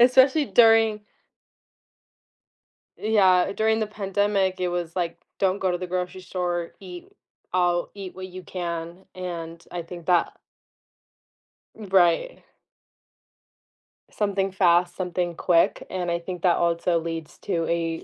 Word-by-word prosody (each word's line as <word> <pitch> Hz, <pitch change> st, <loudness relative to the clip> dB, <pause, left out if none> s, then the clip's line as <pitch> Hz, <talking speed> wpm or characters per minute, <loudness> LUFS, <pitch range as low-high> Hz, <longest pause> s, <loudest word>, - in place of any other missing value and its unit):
especially 260 Hz, +4 st, +6 dB
during 225 Hz, -2 st, +5 dB, 2.0 s
Yeah, 195 Hz, -4 st, +3 dB
during 220 Hz, +2 st, +1 dB
the 215 Hz, -, -1 dB
pandemic, 195 Hz, -2 st, 0 dB
it 180 Hz, -1 st, 0 dB
was, 175 Hz, -1 st, -3 dB
like, 175 Hz, -2 st, -2 dB, 0.2 s
"Don't 190 Hz, 0 st, +1 dB
go 185 Hz, -1 st, +1 dB
to 175 Hz, -, -1 dB
the 180 Hz, 0 st, -5 dB
grocery 180 Hz, +1 st, -3 dB
store," 175 Hz, -2 st, -3 dB
"Eat 180 Hz, -2 st, -10 dB, 0.4 s
I'll 175 Hz, -1 st, +1 dB
eat 195 Hz, -3 st, -8 dB
what 185 Hz, 0 st, -7 dB
you 185 Hz, 0 st, -10 dB
can," 170 Hz, 0 st, -5 dB
and, 170 Hz, -2 st, -6 dB
I 175 Hz, -1 st, -3 dB
think 170 Hz, 0 st, -10 dB
that 175 Hz, -2 st, +2 dB, 1.4 s
Mm, 205 Hz, -4 st, -10 dB
right. 180 Hz, -, +3 dB, 1.7 s
Something 195 Hz, -2 st, -1 dB
fast, 175 Hz, -2 st, +3 dB
something 180 Hz, -1 st, -2 dB
quick, 170 Hz, -2 st, +2 dB
and 180 Hz, -1 st, -2 dB
I 170 Hz, -, 0 dB
think 180 Hz, 0 st, -7 dB
that 175 Hz, -2 st, +4 dB
also 170 Hz, 0 st, +1 dB
leads 165 Hz, -1 st, -6 dB
to 165 Hz, -1 st, -1 dB
a 165 Hz, -1 st, -1 dB
180 Hz, 130 wpm, -25 LUFS, 170-195 Hz, 2.0 s, especially